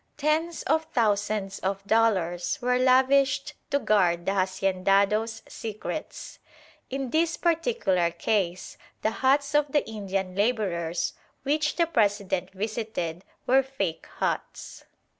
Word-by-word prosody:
Tens 310 +3 0
of 315 +2 +1
thousands 205 -7 0
of 195 +1 -3
dollars 190 -6 +1
were 250 0 +1
lavished 270 +2 +3 0.2
to 280 - +2
guard 180 -9 +2
the - - +1
haciendados' 195 +3 +1
secrets. 215 -2 -6 0.5
In 270 -1 -3
this 330 +1 +1
particular 330 - +1
case 180 +1 -2 0.2
the 220 - +2
huts 280 +4 +1
of 295 -1 +2
the 295 - +1
Indian 195 -3 -3
labourers 185 -6 0 0.3
which 300 +2 +1
the 340 - +3
President 205 - 0
visited 195 -4 -4 0.2
were 265 +2 +5
"fake" 250 -11 -4
huts. - - -3
215 Hz, 115 wpm, -26 LUFS, 190-275 Hz, 0.5 s, were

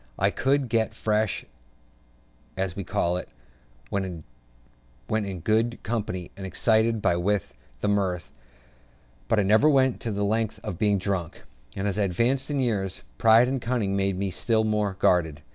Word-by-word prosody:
I - - +2
could 135 0 +1
get 115 -1 0
"fresh," 110 -1 0 1.1
as 95 -2 -1
we 100 - -4
call 85 0 0
it, - - -6 0.6
when 95 -5 -3 0.9
in 100 -4 -1
good 115 +5 +1
company 95 -5 -3
and 100 - -9
excited 110 +3 +1
by - - +3
wit 100 +3 0 0.3
and 105 - +3
mirth; 95 -4 -1 1.0
but 110 - +2
I - - +3
never 110 +10 +5
went 130 -3 +3
to 115 - -3
the 100 0 -1
length 110 +1 -1
of 100 -6 -5
being 105 -1 +3
drunk; 95 -4 -3 0.3
and, 95 +1 -2
as 100 +1 -1
I - - +3
advanced 120 - 0
in 145 -1 -1
years, 105 -7 -1 0.2
pride 115 +2 +6
and 130 0 -2
cunning 115 -5 -1
made 95 -1 0
me 95 0 -2
still 110 +4 +1
more 105 -2 0
guarded. 80 -5 +2
105 Hz, 160 wpm, -26 LUFS, 95-115 Hz, 1.1 s, pride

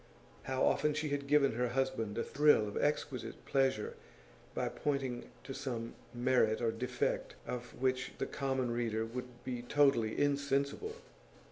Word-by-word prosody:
How 130 0 0
often 150 0 +3
she 155 0 -1
had 140 0 -2
given 145 -1 +5
her 125 +2 0
husband 120 -5 -1
a 115 - +1
thrill 150 -7 +4
of 105 - -6
exquisite 145 -3 -1
pleasure 130 -6 +1 0.6
by - - 0
pointing 135 -4 -2
to 135 - -6
some 120 -4 -4 0.2
merit 120 -3 +3
or 115 -1 +1
defect 120 +3 -1
of 120 -1 -6
which 130 0 0
the - - -1
common 130 -3 -1
reader 115 -2 0
would 125 +1 -7
be 125 -2 -3
totally 120 -4 +3
insensible! 140 - +1
130 Hz, 145 wpm, -34 LUFS, 120-140 Hz, 0.6 s, given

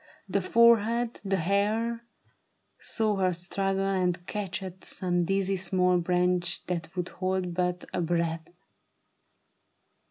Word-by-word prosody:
The 200 +1 0
forehead, 235 +2 +3
the 195 -1 0
hair 210 +6 0 0.4
— - - -47 0.2
saw 215 -2 0
her 185 -1 +2
struggle 195 +2 -1
and 180 -2 0
catch 195 -2 -3
At 185 0 -9
some 175 -2 -1
dizzy 195 +1 0
small 180 0 +2
branch 180 0 0
that 175 0 -4
would 180 -1 -2
hold 185 -1 -2
but 180 0 -1
a - - 0
breath. 165 -1 -1
185 Hz, 125 wpm, -28 LUFS, 175-200 Hz, 0.4 s, forehead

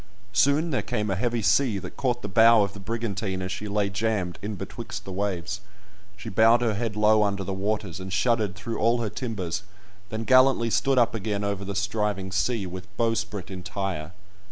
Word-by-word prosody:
Soon 140 +8 +3
there 130 - +1
came 105 -1 -2
a - - +1
heavy 115 +3 -1
sea, 110 +2 +3
that 90 -2 -7
caught 125 -2 -1
the - - -2
bow 115 +2 +6
of 100 0 -3
the 105 - -9
brigantine 100 -2 -3
as 95 - -4
she 105 +1 -4
lay 105 0 +1
jammed 100 -3 -1
in 105 +1 -4
betwixt - - -7
the 95 - -6
waves; 100 +1 -2 0.6
she 95 - -9
bowed 115 +4 +5
her 115 -2 +1
head 105 0 -2
low 105 0 +4
under 100 -1 0
the 95 - -3
waters, 100 -2 -2
and 95 0 -7
shuddered 105 -1 +1
through 115 +3 -5
all 115 +2 +3
her 110 -3 -2
timbers, 105 -6 -3 0.5
then 110 +1 -3
gallantly 130 -2 +4
stood 135 +3 +2
up 120 -1 +4
again 105 -2 -2
over 100 -1 -2
the 100 0 -5
striving 100 -1 -1
sea, 105 +2 0
with 90 +1 -7
bowsprit 110 -5 -1
entire. 95 -3 -4
105 Hz, 195 wpm, -26 LUFS, 95-115 Hz, 0.6 s, bow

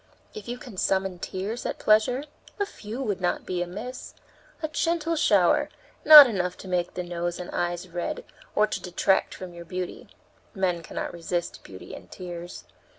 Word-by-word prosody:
If 435 - -9
you 240 +1 -4
can 245 -6 -11
summon 190 -1 0
tears 200 +7 -4
at - - -3
pleasure, 220 +5 +3 0.4
a 405 - +2
few 235 - -7
would 205 -6 -2
not 175 - -1
be 180 -1 -2
amiss; 205 +9 -6 0.5
a - - +1
gentle 330 +1 0
shower, 315 - +3 0.3
not 300 -2 +12
enough 180 -6 -2
to - - -8
make 180 -1 -1
the 180 - -2
nose 175 0 -3
and 180 - -6
eyes 175 +1 -2
red 175 0 -4 0.3
or 210 - +5
to 215 - -4
detract 185 +2 +1
from 185 -2 -8
your 170 0 -9
beauty. 180 +1 -6 0.5
Men 180 -3 0
cannot 160 - -5
resist 170 0 -3
beauty 95 -1 -11
and - - -11
tears. 175 -1 -8
185 Hz, 170 wpm, -26 LUFS, 175-235 Hz, 0.5 s, not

